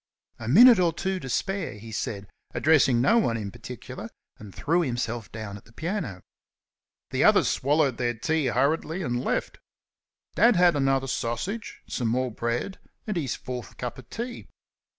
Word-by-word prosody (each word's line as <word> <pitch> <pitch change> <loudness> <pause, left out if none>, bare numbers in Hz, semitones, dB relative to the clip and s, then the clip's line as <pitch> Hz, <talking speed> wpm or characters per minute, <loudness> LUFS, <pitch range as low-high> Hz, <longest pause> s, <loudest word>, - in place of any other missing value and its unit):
"A 110 - -6
minute 230 - +8
or 175 -2 +3
two 190 +3 -2
to 135 - -7
spare," 195 +7 -1
he 110 +2 -10
said, 100 -2 -4 0.3
addressing 135 -6 +4
no 225 - +5
one 115 - +1
in 100 -3 -5
particular, - - -8 0.3
and 105 -2 -10
threw 170 - +1
himself 120 -5 -3
down 105 -2 -6
at - - -17
the 115 - -19
piano. 160 - -4 0.9
The - - +1
others - - +5
swallowed 140 -2 +2
their 120 -1 0
breakfast 140 -1 0
hurriedly 160 +6 +1
and 120 -3 -1
left. - - -2 0.7
Dad 235 -1 +5
had 175 -2 +5
another 135 -1 +2
sausage, 135 - -3
some 120 - -2
more 125 +2 0
bread, 120 - -3 0.3
and 210 - -3
his 145 -8 -1
fourth 125 -2 -7
cup 125 0 -5
of 125 -1 -14
tea. 240 +1 -6
130 Hz, 165 wpm, -26 LUFS, 115-175 Hz, 0.9 s, minute